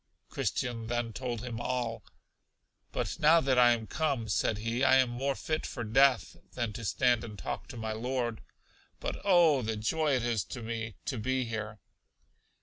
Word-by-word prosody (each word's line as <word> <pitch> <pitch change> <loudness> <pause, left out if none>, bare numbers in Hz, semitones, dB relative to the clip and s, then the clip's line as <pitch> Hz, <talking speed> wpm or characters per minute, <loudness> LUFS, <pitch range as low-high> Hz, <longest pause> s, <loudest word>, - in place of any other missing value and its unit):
Christian 115 -2 -2
then 120 -1 -2
told 120 -2 -4
him 120 -2 -5
all. 120 -2 -2 0.9
But 95 - -3
now 160 +2 +6
that 135 -4 +2
I 120 -1 +7
am 115 -2 -3
come, 140 -5 -1
said 105 +1 +1
he, 115 +4 -1
I 130 0 +6
am 130 -2 +4
more 135 +3 -1
fit 155 +3 -2
for 120 - -5
death, 130 +3 +3 0.2
than 115 -4 -2
to 115 - -7
stand 120 +2 +2
and 105 -3 -8
talk - - -5
to - - -9
my 110 -1 -3
Lord. 120 0 -2 0.6
But - - -4
oh, 170 -8 +5
the 110 -1 -2
joy 150 +6 +1
it 125 - 0
is 115 -4 0
to 120 - -7
me 115 -1 -4
to 130 - -2
be 130 +3 0
here! 110 -1 -5
120 Hz, 180 wpm, -30 LUFS, 115-130 Hz, 0.9 s, I